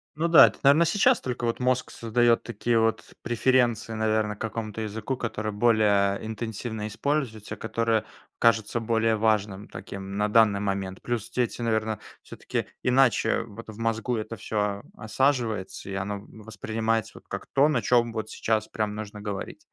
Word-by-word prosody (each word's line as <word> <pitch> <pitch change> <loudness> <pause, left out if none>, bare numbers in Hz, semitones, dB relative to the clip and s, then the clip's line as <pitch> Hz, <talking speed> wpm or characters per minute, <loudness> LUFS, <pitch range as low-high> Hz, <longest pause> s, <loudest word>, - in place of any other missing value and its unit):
Ну 165 +2 0
да, 170 -1 +9
это, - - -6
наверно, 145 +4 +6
сейчас 215 +8 +3
только 125 -1 -3
вот 115 +1 -1
мозг 125 0 0
создаёт 115 +1 +2
такие 115 0 0
вот 115 0 0
преференции, 120 -2 +1
наверно, 110 -1 0
к - - -23
какому-то 110 0 -4
языку, 110 +4 -3
который 110 -3 -3
более 105 -2 +2
интенсивно 110 0 -4
используется, 115 -1 -2
который 115 -1 0 0.4
кажется 115 0 +3
более 115 0 +1
важным 105 -2 0
таким 100 0 -7
на 105 0 +2
данный 105 -2 +4
момент. 95 -2 -3
Плюс 120 -3 -3
дети, 120 -1 -1
наверно, 110 -2 0 0.2
всё-таки - - -4 0.2
иначе 125 -3 +3
вот 115 0 -11
в 110 - -9
мозгу 115 +1 -1
это 110 +1 -5
всё 105 -1 -2 0.2
осаживается, 110 -4 -1
и 100 - -5
оно 100 +1 -3
воспринимается 110 0 -3
вот - - -14
как - - -5
то, 140 +2 +5
на 125 -7 +1
чём 120 +1 +3
вот 110 -1 -4
сейчас 110 -1 -1
прям 105 -1 -2
нужно 105 -1 -7
говорить. 100 -2 -5
110 Hz, 160 wpm, -26 LUFS, 105-120 Hz, 0.4 s, да